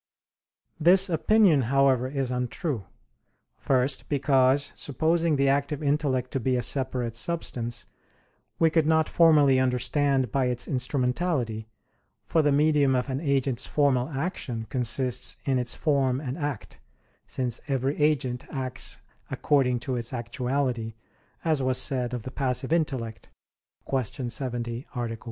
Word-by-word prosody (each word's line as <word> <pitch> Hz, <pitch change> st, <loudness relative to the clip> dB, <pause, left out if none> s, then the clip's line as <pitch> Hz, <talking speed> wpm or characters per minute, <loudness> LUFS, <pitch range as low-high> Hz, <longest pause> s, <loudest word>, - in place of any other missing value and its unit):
This 185 Hz, +4 st, +6 dB
opinion, 175 Hz, -2 st, +4 dB
however, 135 Hz, -2 st, +3 dB
is 135 Hz, -2 st, -3 dB
untrue. 125 Hz, -, -3 dB, 0.7 s
First, 135 Hz, +1 st, 0 dB
because, 135 Hz, -1 st, +2 dB
supposing 160 Hz, +3 st, 0 dB
the 140 Hz, 0 st, +2 dB
active 140 Hz, +2 st, 0 dB
intellect 140 Hz, -3 st, 0 dB
to 135 Hz, -, -1 dB
be 130 Hz, +1 st, 0 dB
a 125 Hz, -, -1 dB
separate 130 Hz, -4 st, -1 dB
substance, 120 Hz, -4 st, -2 dB, 0.7 s
we 165 Hz, -1 st, +3 dB
could 160 Hz, -1 st, +2 dB
not 160 Hz, 0 st, +3 dB
formally 150 Hz, -5 st, +5 dB
understand 130 Hz, 0 st, +1 dB
by 135 Hz, -2 st, +1 dB
its 125 Hz, -1 st, -2 dB
instrumentality, 125 Hz, -3 st, -1 dB, 0.6 s
for 160 Hz, -, +2 dB
the 145 Hz, -1 st, +2 dB
medium 145 Hz, -2 st, +3 dB
of 125 Hz, +2 st, -1 dB
an 130 Hz, -, -2 dB
agent's 135 Hz, -4 st, 0 dB
formal 135 Hz, -3 st, +1 dB
action 135 Hz, -6 st, -4 dB
consists 125 Hz, 0 st, +1 dB
in 135 Hz, -2 st, +1 dB
its 125 Hz, -1 st, -2 dB
form 135 Hz, -4 st, +1 dB
and 135 Hz, -3 st, -5 dB
act, 145 Hz, -7 st, -5 dB, 0.5 s
since 125 Hz, -2 st, -3 dB
every 135 Hz, 0 st, -1 dB
agent 135 Hz, -5 st, 0 dB
acts 130 Hz, -2 st, -4 dB, 0.3 s
according 130 Hz, -4 st, +1 dB
to 125 Hz, +1 st, -3 dB
its 120 Hz, +2 st, -4 dB
actuality, 125 Hz, -1 st, -2 dB, 0.5 s
as 155 Hz, -4 st, +1 dB
was 130 Hz, -1 st, +2 dB
said 125 Hz, -2 st, 0 dB
of 120 Hz, -, -6 dB
the 130 Hz, -, -7 dB
passive 130 Hz, +1 st, -1 dB
intellect 130 Hz, -9 st, -2 dB, 0.6 s
(Q. 130 Hz, -1 st, -2 dB
70, 120 Hz, -2 st, -4 dB
A. -, -, -3 dB
1). 115 Hz, -1 st, -3 dB
135 Hz, 135 wpm, -26 LUFS, 125-145 Hz, 0.7 s, This